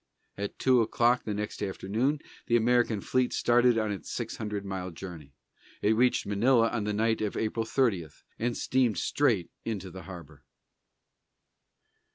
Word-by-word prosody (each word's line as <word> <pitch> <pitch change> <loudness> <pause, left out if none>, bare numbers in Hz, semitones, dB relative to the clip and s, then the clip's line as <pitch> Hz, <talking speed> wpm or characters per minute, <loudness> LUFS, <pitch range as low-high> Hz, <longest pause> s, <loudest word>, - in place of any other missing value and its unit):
At 100 0 -5
two 130 -2 +4
o'clock 120 +2 +2
the 105 - -2
next 105 0 -4
afternoon, 110 +9 -1 0.3
the 120 - +3
American 120 -2 +2
fleet 130 +3 0
started 120 0 +4
on 110 -2 0
its 95 -6 -6
six - - -4
hundred 105 -2 -4
mile 95 -1 -4
journey. 85 -5 -9 0.5
It 110 +2 +4
reached 125 +2 +2
Manila 115 +3 +3
on 110 -4 -2
the 105 - 0
night 110 +1 +1
of 105 -2 -2
April 110 0 -1
30, 110 - +1 0.3
and 120 +1 -1
steamed 125 -6 +1
straight 110 -3 +1
into 100 -5 -4
the 95 +2 -9
harbor. 85 -6 -10
110 Hz, 155 wpm, -29 LUFS, 95-120 Hz, 0.5 s, two